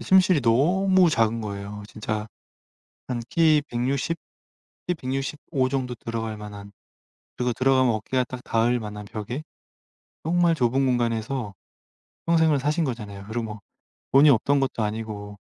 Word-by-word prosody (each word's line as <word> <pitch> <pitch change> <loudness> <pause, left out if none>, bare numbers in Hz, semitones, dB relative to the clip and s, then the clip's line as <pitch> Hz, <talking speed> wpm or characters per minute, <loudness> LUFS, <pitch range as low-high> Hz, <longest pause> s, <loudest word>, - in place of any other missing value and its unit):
침실이 185 -4 +4
너무 180 +10 +4
작은 115 -2 +2
거예요. 105 0 -6
진짜 105 0 -4 0.8
한 125 -2 -2
키 155 -3 +4
160 130 +6 -1 0.7
키 180 - +1
165 135 -1 -2
정도 130 -2 -2
들어갈 115 -2 -4
만한. 105 -1 -9 0.6
그리고 125 -1 0
들어가면 130 -1 +3
어깨가 125 +4 0
딱 125 +1 -8
닿을 120 +2 +2
만한 105 -1 -7
벽에. 110 +7 -5 0.8
정말 170 0 +3
좁은 130 +1 +2
공간에서 120 -2 -1 0.7
평생을 160 -3 +4
사신 150 +4 0
거잖아요. 105 -6 -5
그리고 110 -2 -4 0.5
돈이 145 +2 +7
없던 140 +3 +3
것도 130 -4 -1
아니고 105 -1 -4
125 Hz, 265 characters per minute, -25 LUFS, 110-140 Hz, 0.8 s, 돈이